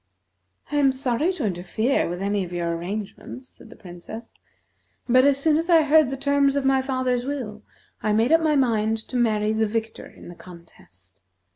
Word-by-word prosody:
"I 295 - 0
am 275 -2 +4
sorry 265 +5 0
to 320 -10 -4
interfere 200 +6 -1
with 175 +2 -5
any 200 0 0
of 175 - -8
your 170 -1 -2
arrangements," 205 +8 -7
said - - -17
the 235 - -13
Princess, 185 +6 -11 0.7
"but 255 +2 +5
as 280 -1 +4
soon 300 +2 +2
as 330 +2 -3
I 330 -2 +6
heard 300 -2 +4
the 270 - -4
terms 280 0 +1
of 280 -1 -1
my 270 0 +3
father's 255 -2 -1
will, 250 -6 -5 0.4
I 215 - 0
made 225 +5 +2
up 325 0 +5
my 310 -2 +2
mind 225 -5 +1
to - - -7
marry 215 -3 +1
the 220 0 +1
victor 225 +1 -4
in - - -15
the 175 - -9
contest. 100 - -17
235 Hz, 190 wpm, -23 LUFS, 205-275 Hz, 0.7 s, I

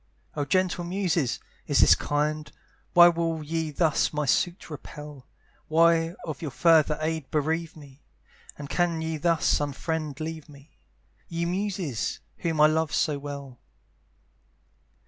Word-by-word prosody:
Oh 145 -2 -1
gentle 180 +3 +1
muses! 175 -6 -1 0.3
is - - +3
this - - +8
kind? 150 +1 -1 0.4
Why 175 0 +9
will 165 -2 0
ye 160 +1 -2
thus 155 +1 +1
my 150 -1 -1
suit 175 +4 0
repel? 150 -2 -9 0.4
Why 165 +1 +3
of 155 0 -6
your 155 - -3
further 155 +1 +4
aid 160 -3 -2
bereave 160 +2 -1
me? 140 -1 -15 0.6
And 145 - -7
can 170 0 0
ye 160 0 -2
thus 165 +1 +2
unfriended 150 +1 -3
leave 160 -1 -6
me? 140 +1 -17 0.5
Ye 170 0 -2
muses! 180 - -2 0.2
whom 165 -3 -2
I - - +9
love 155 0 +2
so 145 -2 +1
well. 140 -3 -8
160 Hz, 135 wpm, -26 LUFS, 145-170 Hz, 0.6 s, Why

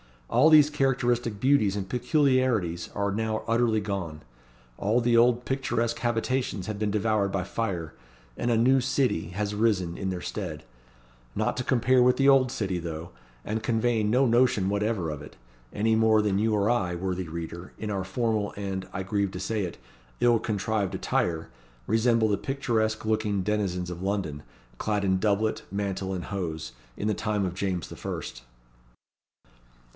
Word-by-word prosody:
All 130 +7 +6
these 150 -2 +7
characteristic 120 -6 0
beauties 130 -8 +3
and 100 -2 -3
peculiarities 125 - +1
are 100 0 0
now 110 +1 -1
utterly 115 -1 +2
gone. 95 -7 -4 0.6
All 110 +5 +2
the 120 0 +2
old 120 +1 +4
picturesque 120 -3 -1
habitations 120 -3 -1
have 105 -2 -4
been 105 -1 0
devoured 105 -1 +1
by 95 -2 0
fire, 95 -5 -3 0.4
and 120 - -2
a 115 - +3
New 130 +4 +4
City 130 - 0
has 100 +2 -2
risen 100 -6 +1
in 95 - -2
their 90 -1 -3
stead; 80 -7 -5 0.7
not - - 0
to 125 - -2
compare 130 +1 +3
with 125 0 +5
the 135 0 +5
Old 135 -2 +5
City, 100 -8 -2
though 85 0 -6 0.3
and 110 +1 -2
conveying 115 -2 +1
no 125 +5 +4
notion 120 -5 +3
whatever 100 -4 0
of 75 - -6
it - - -11 0.4
any 110 +2 +1
more 110 -1 +4
than 100 -2 +1
you 110 0 +2
or 100 0 +1
I, 90 -8 +1
worthy 90 0 -3
reader, 85 +2 -7
in 105 -1 -4
our 95 -2 -2
formal, 110 0 -1
and, 95 -2 -4
I 100 - -3
grieve 100 0 -1
to 90 - -6
say 105 +1 -1
it, 85 - -7 0.4
ill 120 -1 +4
contrived 105 -2 -1
attire, 80 -2 -1 0.4
resemble 115 0 +3
the 100 - +2
picturesque 110 -6 -1
looking 105 -3 0
denizens 90 -3 -1
of 90 0 -7
London, 95 -7 -2 0.4
clad 105 -2 0
in 95 -1 +2
doublet, 110 +2 +1
mantle, 100 -1 -2
and 90 -2 -4
hose, 80 -6 -4 0.3
in 105 - -2
the - - +2
time 105 -1 -1
of 90 - -3
James 90 -3 -2
the - - -9
First. 60 - -6
105 Hz, 170 wpm, -27 LUFS, 95-115 Hz, 0.7 s, these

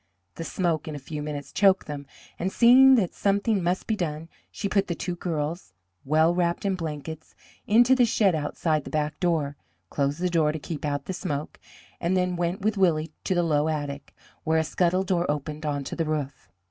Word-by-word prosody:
The 165 - -6
smoke 165 -3 -1
in 155 - -5
a - - -4
few 150 +2 -6
minutes 145 -1 -5
choked 195 -1 +3
them, 145 -2 -7 0.3
and, 185 +2 -1
seeing 260 +4 +7
that 200 -8 +1
something 200 +1 +1
must 180 +2 -1
be 220 - 0
done, 160 -3 -4 0.2
she 200 - -4
put 195 0 +1
the 170 - -2
two 180 - -3
girls, 160 - -4 0.3
well 155 +4 +3
wrapped 175 +1 0
in 195 - +2
blankets, 160 -2 -6 0.3
into 240 +4 +5
the 255 -2 +5
shed 205 -4 +2
outside 155 0 -1
the - - -8
back 150 0 -2
door, 155 -6 0 0.3
closed 140 +2 -1
the 180 - +1
door 160 -4 +2
to - - -3
keep 155 0 -6
out 145 -1 -2
the 190 - -4
smoke, 155 -5 -4 0.4
and 175 +2 +1
then 180 -1 0
went 175 +2 -2
with 215 +1 0
Willie 165 -4 +2
to 190 - +1
the 175 - +2
low 150 -2 +2
attic, 145 -2 -4 0.3
where 160 0 +2
a 160 - +3
scuttle 180 +3 +1
door 180 -2 0
opened 150 +1 -3
onto 145 -2 -3
the 165 - -1
roof. 145 -4 -4
165 Hz, 200 wpm, -26 LUFS, 150-185 Hz, 0.4 s, seeing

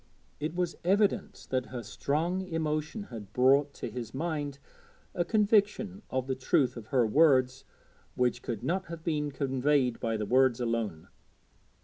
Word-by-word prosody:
It 155 +2 -3
was 180 -1 -1
evident 200 +3 +1
that 130 -1 0
her 125 -2 -6
strong 155 - -1
emotion 160 +1 -2
had 105 -3 -8
brought 135 +3 +4
to - - -5
his 120 -2 -6
mind 145 -2 -2 0.6
a 175 - +1
conviction 205 0 +2
of 130 -1 -1
the 135 - -1
truth 130 0 +1
of 115 -3 -9
her 125 -1 +3
words 130 0 +3 0.5
which 125 -1 +1
could 115 -2 -5
not 185 +7 -1
have 165 -1 -8
been 150 -3 -1
conveyed 135 -2 +1
by 115 -1 -1
the 105 - -2
words 130 +1 +3
alone. 115 -9 -2
140 Hz, 150 wpm, -30 LUFS, 125-165 Hz, 0.6 s, brought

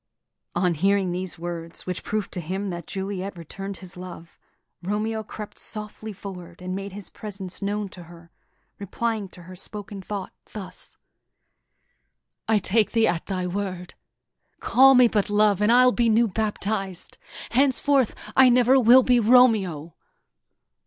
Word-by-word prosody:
On 175 0 +2
hearing 195 +3 +1
these 180 0 -4
words, 170 0 -6
which 180 -1 -4
proved 215 -3 -3
to 180 - -4
him 190 +4 -3
that 170 -2 -7
Juliet 195 -1 -4
returned 195 +4 -7
his 185 -2 -8
love, 180 -2 -10 0.4
Romeo 215 +4 -2
crept 210 0 -9
softly 215 0 -6
forward 180 -3 -9
and 185 0 -4
made 195 +1 -5
his 200 0 -8
presence 195 -3 -7
known 205 +1 -2
to 180 -2 -12
her, 170 0 -15 0.5
replying 215 +1 -2
to 180 -1 -15
her 185 +2 -11
spoken 205 +1 -6
thought 195 0 -6 0.2
thus: 200 -4 -9 1.5
"I 220 -1 +4
take 210 +2 +1
thee 225 -1 +4
at 170 -6 -1
thy 185 -2 -2
word! 180 -1 -4 0.7
Call 270 +2 +6
me 250 -1 +7
but 210 -2 0
love, 205 -1 +3
and 210 +2 +4
I'll 250 +1 +6
be 235 -1 +2
new 230 +2 +4
baptiz'd; 200 -2 -3 0.3
Henceforth 270 0 +2 0.2
I 260 -1 +7
never 250 +2 +5
will 250 +2 +7
be 245 -1 +4
Romeo!" 210 -10 +3
200 Hz, 145 wpm, -24 LUFS, 180-220 Hz, 1.5 s, me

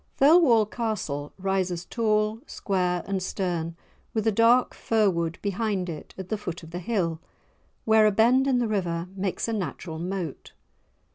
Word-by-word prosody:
Thirlwall 275 -7 +6
Castle 205 -11 -3
rises 185 -2 -1
tall, 215 -1 0
square, 180 -3 -1
and 195 -1 -2
stern, 175 -3 -2 0.4
with 220 -1 0
a 220 - +4
dark 230 +4 +4
fir 215 -3 +2
wood 170 -1 -2
behind 200 -2 -1
it 155 -3 -8
at 190 -1 -7
the 215 - -2
foot 175 -4 -6
of 165 - -11
the 175 - -4
hill, 175 -5 -1 0.7
where 220 -1 +5
a - - +4
bend 245 +6 +4
in 260 -2 +3
the 240 -1 +1
river 175 -4 -2
makes 190 +2 -2
a 230 - -1
natural 165 -4 -4
moat. 175 -4 -5
195 Hz, 160 wpm, -26 LUFS, 175-220 Hz, 0.7 s, Thirlwall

